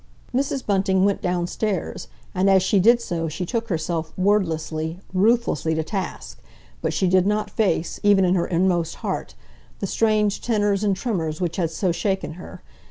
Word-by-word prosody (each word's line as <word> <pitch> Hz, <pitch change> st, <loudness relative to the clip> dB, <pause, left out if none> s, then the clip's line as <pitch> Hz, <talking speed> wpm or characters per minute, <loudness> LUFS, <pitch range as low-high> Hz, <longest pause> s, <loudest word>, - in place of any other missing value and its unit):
Mrs. 270 Hz, +1 st, -1 dB
Bunting 190 Hz, -1 st, +2 dB
went 200 Hz, -1 st, +1 dB
downstairs, 180 Hz, +1 st, -2 dB, 0.3 s
and 190 Hz, +2 st, +2 dB
as 190 Hz, -1 st, +5 dB
she 195 Hz, +1 st, +3 dB
did 235 Hz, +5 st, +5 dB
so 170 Hz, -7 st, -3 dB
she 160 Hz, +4 st, -4 dB
took 230 Hz, +4 st, -2 dB
herself 160 Hz, -1 st, -2 dB
wordlessly, 165 Hz, -4 st, 0 dB
ruthlessly 190 Hz, -, +2 dB
to 160 Hz, -, 0 dB
task, 155 Hz, -, -5 dB, 0.4 s
but -, -, 0 dB
she 190 Hz, -, 0 dB
did 185 Hz, +1 st, +3 dB
not 210 Hz, 0 st, 0 dB
face—even 200 Hz, 0 st, +2 dB
in 180 Hz, -, +3 dB
her 175 Hz, -2 st, +1 dB
inmost 175 Hz, -1 st, +1 dB
heart—the -, -, -6 dB
strange 210 Hz, 0 st, +1 dB
tenors 205 Hz, -3 st, +1 dB
and 200 Hz, -2 st, +2 dB
tremors 170 Hz, -8 st, -2 dB
which 170 Hz, -3 st, -2 dB
had 170 Hz, -4 st, 0 dB
so 175 Hz, +3 st, 0 dB
shaken 190 Hz, -1 st, -2 dB
her. 180 Hz, +3 st, -11 dB
190 Hz, 160 wpm, -23 LUFS, 170-205 Hz, 0.4 s, as